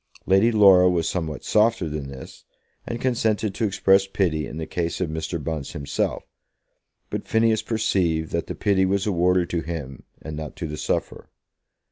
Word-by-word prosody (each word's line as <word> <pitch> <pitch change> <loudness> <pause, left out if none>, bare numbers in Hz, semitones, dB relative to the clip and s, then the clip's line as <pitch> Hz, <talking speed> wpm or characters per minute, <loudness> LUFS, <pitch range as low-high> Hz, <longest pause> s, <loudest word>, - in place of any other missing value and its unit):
Lady 95 +5 +4
Laura 95 -4 +6
was 85 -2 0
somewhat 80 -5 -3
softer 110 -4 +2
than 75 -2 -5
this, 65 -1 -11 0.4
and 120 - -4
consented 110 -5 0
to 110 +4 -1
express 95 -1 +3
pity 85 -7 0
in 75 - -8
the 80 - -4
case 85 0 -3
of 90 -4 -2
Mr. 80 +2 -3
Bunce 75 -1 -4
himself; 70 -4 -2 0.9
but - - -4
Phineas 110 -1 +2
perceived 85 -8 0
that - - -2
the - - -5
pity 100 -2 +2
was 95 +1 +1
awarded 90 -2 +2
to 85 - 0
him 75 -6 -6 0.2
and 80 -1 -7
not 75 -2 -7
to - - -5
the 75 -1 -5
sufferer. - - -3
90 Hz, 170 wpm, -23 LUFS, 80-100 Hz, 0.9 s, Laura